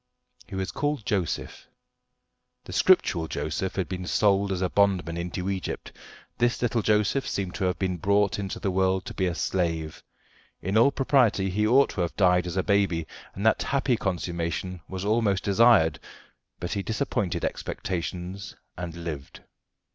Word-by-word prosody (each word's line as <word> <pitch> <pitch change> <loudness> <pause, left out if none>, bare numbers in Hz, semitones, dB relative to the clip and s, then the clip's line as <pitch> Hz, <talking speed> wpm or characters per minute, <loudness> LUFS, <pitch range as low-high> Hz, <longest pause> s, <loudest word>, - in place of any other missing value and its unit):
He - - -8
was 95 0 -2
called 145 -6 -2
Joseph. 95 -6 -2 1.0
The - - -9
scriptural 80 -1 +3
Joseph 80 +6 -3
had 95 -2 -1
been 90 -1 -5
sold 100 -1 +2
as 95 -1 -1
a - - +2
bondman 95 -4 +2
into 90 +2 -4
Egypt; 95 -2 -4 0.5
this 120 0 +2
little 120 -1 +1
Joseph 105 +6 +1
seemed 95 -3 -3
to 95 - -2
have 90 -1 0
been 95 -2 -1
brought 100 +3 +2
into 95 -2 -4
the 95 - -1
world 95 0 +1
to - - -6
be 95 - 0
a 85 - -2
slave. 80 -4 -2 0.6
In 95 +4 -3
all 115 +5 +6
propriety 125 -9 +2
he 105 +3 +1
ought 135 +5 +5
to 95 - -3
have 85 0 -2
died 90 -2 +3
as 90 +1 -4
a 95 - +2
baby, 100 -6 +1 0.3
and 100 - -4
that 110 - +4
happy 135 -2 +1
consummation 90 -2 -3
was 95 0 -4
almost 105 -3 +1
desired, 100 -8 +4 0.6
but 90 - -3
he 100 - -1
disappointed 110 -4 -1
expectations 90 +2 -4 0.2
and 85 -1 -6
lived. 75 -5 -6
95 Hz, 160 wpm, -26 LUFS, 90-105 Hz, 1.0 s, all